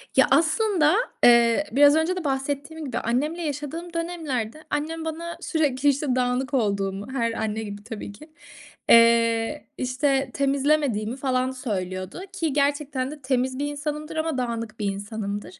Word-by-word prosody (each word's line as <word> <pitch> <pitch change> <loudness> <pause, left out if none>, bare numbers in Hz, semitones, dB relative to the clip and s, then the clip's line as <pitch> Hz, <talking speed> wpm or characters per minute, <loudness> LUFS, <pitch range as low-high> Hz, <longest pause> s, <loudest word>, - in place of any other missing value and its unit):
Ya, 265 - +6
aslında, 320 +2 +3 0.3
eee, 235 +3 +6
biraz 285 +3 +6
önce 325 +4 +1
de 365 - -4
bahsettiğim 285 +3 -3
gibi 255 - -3
annemle 295 +9 -1
yaşadığım 315 +3 -5
dönemlerde 310 -6 -3
annem 320 +2 -2
bana 335 +2 -5
sürekli, 290 -3 +1
işte, 275 -2 0
dağınık 255 +2 0
olduğumu, 200 -4 0
her 230 -3 0
anne 220 0 -2
gibi 205 0 -7
tabii 215 -2 -7
ki, 305 +10 -14 0.6
eee, 230 +3 +4
işte, 270 +1 0
temizlemediğimi, 275 -5 +1
falan, 255 -1 0
söylüyordu 185 - -4
ki 325 -6 -1
gerçekten 280 -1 0
de 295 -2 -10
temiz 260 0 0
bir 290 - 0
insanımdır 300 +2 -4
ama 315 -3 -1
dağınık 230 -3 -3
bir 205 - -2
insanımdır. 205 -1 -5
270 Hz, 140 wpm, -24 LUFS, 230-300 Hz, 0.6 s, Ya